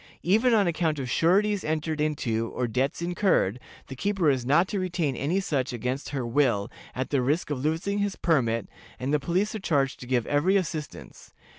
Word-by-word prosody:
Even 225 +7 +4
on 205 -2 +4
account 165 -2 0
of 130 -3 -4
sureties 200 +6 +2
entered 155 0 -2
into 115 -7 -1
or 125 - 0
debts 130 +7 -1
incurred, 175 - +1 0.3
the 135 - -8
keeper 190 0 +1
is 125 -2 -2
not 160 +7 +4
to 200 - -2
retain 175 -7 -1
any 155 +10 0
such 135 -9 -1
against 125 +4 -3
her 135 -4 -3
will, 120 -5 +1 0.2
at 130 0 -3
the 140 -3 +2
risk 150 +5 0
of 135 -2 -3
losing 165 +7 0
his 200 -1 -1
permit, 115 - +1 0.3
and 130 +4 -2
the 150 - +3
police 185 +8 0
are 220 - -4
charged 140 -8 0
to 125 - -9
give 125 -3 +1
every 170 +7 +2
assistance. 160 -5 -6
150 Hz, 190 wpm, -26 LUFS, 130-180 Hz, 0.3 s, Even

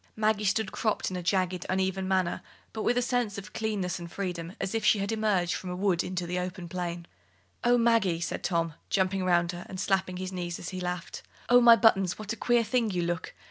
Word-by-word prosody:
Maggie 215 -1 +1
stood 205 0 +1
cropped 215 -3 -1
in - - -4
a 180 - -3
jagged, 180 0 0
uneven 190 0 0
manner, 185 -2 0 0.3
but 220 - -4
with 245 +3 +1
a 245 - +2
sense 240 -5 -1
of 200 +1 -8
clearness 195 -5 -2
and 170 -1 -8
freedom, 175 -3 -4
as 195 - -3
if 225 - -1
she - - +5
had 200 +1 -2
emerged 210 -6 +1
from 185 - -5
a 180 - -3
wood 185 -2 +1
into 180 -1 -3
the 180 +1 -2
open 180 -1 -5
plain. 175 -1 -4 0.6
"Oh, 245 0 +4
Maggie," 230 -8 +3
said 170 - -3
Tom, 165 -3 0 0.2
jumping 190 0 +1
round 175 -1 +2
her 175 0 -7
and 185 - -6
slapping 190 -2 0
his 185 0 -4
knees 175 -2 -3
as 175 - -6
he 185 -1 -5
laughed; 180 -1 -4 0.3
"oh, 245 0 +7
my 235 -1 +9
buttons, 195 -6 +3
what 215 0 -4
a - - -5
queer 240 0 +2
thing 230 0 +1
you 180 -3 -1
look! 170 -1 -3
185 Hz, 225 wpm, -28 LUFS, 180-215 Hz, 0.6 s, my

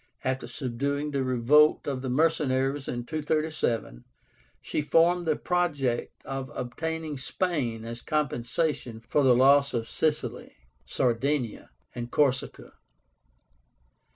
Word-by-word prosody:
After 130 0 -2
subduing 140 +3 -2
the 140 -2 0
revolt 130 +5 +4
of 135 -3 -2
the 130 - -3
mercenaries 135 -1 +1
in 120 -1 -4
237, 155 - -1 0.6
she - - -2
formed 170 +3 +3
the 155 - +3
project 145 -10 -1
of 135 -1 -4
obtaining 160 +3 -4
SPAIN 130 -8 -2
as 115 +1 -7
compensation 145 -3 -1
for 115 +6 0
the 130 -3 +5
loss 140 +2 +5
of 115 -1 -2
Sicily, 155 +3 -2 0.3
Sardinia, 125 - -1 0.2
and 120 0 -5
Corsica. 135 -2 0
135 Hz, 110 wpm, -27 LUFS, 125-155 Hz, 0.6 s, the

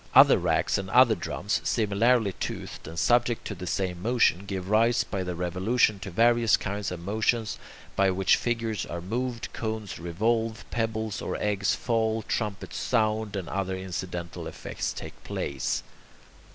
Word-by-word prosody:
Other - - +8
racks - - +1
and 95 -1 -5
other 120 +2 +6
drums, 85 - -2
similarly 110 0 +2
toothed - - -5
and 80 - -8
subject 120 +3 +2
to - - -3
the 90 -1 -7
same 90 0 -2
motion, 115 -4 +2
give 95 -2 -4
rise 115 +3 +3
by 100 - -3
their 90 -1 -4
revolution 95 +5 +1
to 100 0 -6
various 115 +3 +4
kinds 100 0 -3
of 90 - -5
motions, 110 +4 0 0.4
by 95 0 +4
which 95 0 +3
figures 115 -2 -1
are 85 - -4
moved, 120 +6 -3
cones 110 -3 -4
revolve, 110 +6 -1
pebbles 110 -2 -2
or - - -3
eggs 100 -1 +1
fall, 115 -2 0
trumpets 105 -3 -3
sound, 110 -3 0
and 95 -4 -3
other 95 -1 -2
incidental 90 -2 -5
effects - - -4
take - - -9
place. 70 -2 -2
105 Hz, 150 wpm, -27 LUFS, 95-115 Hz, 0.4 s, Other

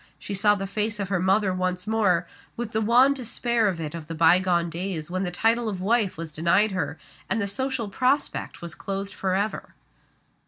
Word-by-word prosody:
She 205 - -6
saw 205 +1 +4
the 195 -1 -4
face 210 +2 -2
of 195 -2 -3
her 195 -3 +1
mother 190 +1 +2
once 185 0 -1
more, 200 -6 +2 0.3
with 235 -2 -4
the 220 - 0
wan 245 +5 +5
despair 235 -3 0
on 175 -3 -4
it 155 -2 -4
of 165 -2 -7
the 165 - -5
bygone 170 +1 +4
days 170 -1 -4
when 185 +1 -1
the 185 - -1
title 225 +5 +1
of 195 -3 -4
wife 205 -1 +1
was 165 -1 -6
denied 170 +7 +2
her, 180 -5 -2 0.3
and 230 - +1
the 200 - 0
social 260 +2 -2
prospect 255 0 -1
was 170 -3 -5
closed 195 +3 -4
forever. 195 +3 -2
195 Hz, 195 wpm, -25 LUFS, 180-220 Hz, 0.3 s, wan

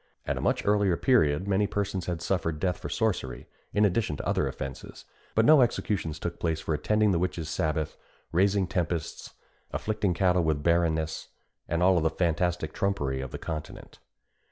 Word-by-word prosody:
At - - -1
a - - -4
much - - 0
earlier 100 -4 +3
period 95 - +3
many 100 +1 +2
persons 95 -3 -2
had 85 -2 -3
suffered 85 -4 -1
death 90 0 -1
for - - -6
sorcery, 65 - -1 0.3
in 105 +1 +3
addition 100 -6 0
to - - -5
other - - +1
offences; 65 0 -7 0.3
but 110 - +4
no 155 0 +7
executions 100 -9 0
took 85 +1 -5
place 80 -2 0
for 80 - -2
attending 105 +8 +2
the 85 - +2
witches' 85 -3 -2
sabbath, 80 -1 -1 0.3
raising 95 +3 +3
tempests, 85 -3 -3 0.4
afflicting 105 -4 -1
cattle 90 -1 +3
with 75 -2 0
barrenness, 80 -2 +1 0.4
and 85 +1 0
all 90 -2 +5
the 80 - +2
fantastic 85 -1 0
trumpery 70 -10 -1
of 65 - -5
the - - -6
continent. 80 -2 -7
85 Hz, 170 wpm, -28 LUFS, 80-100 Hz, 0.4 s, no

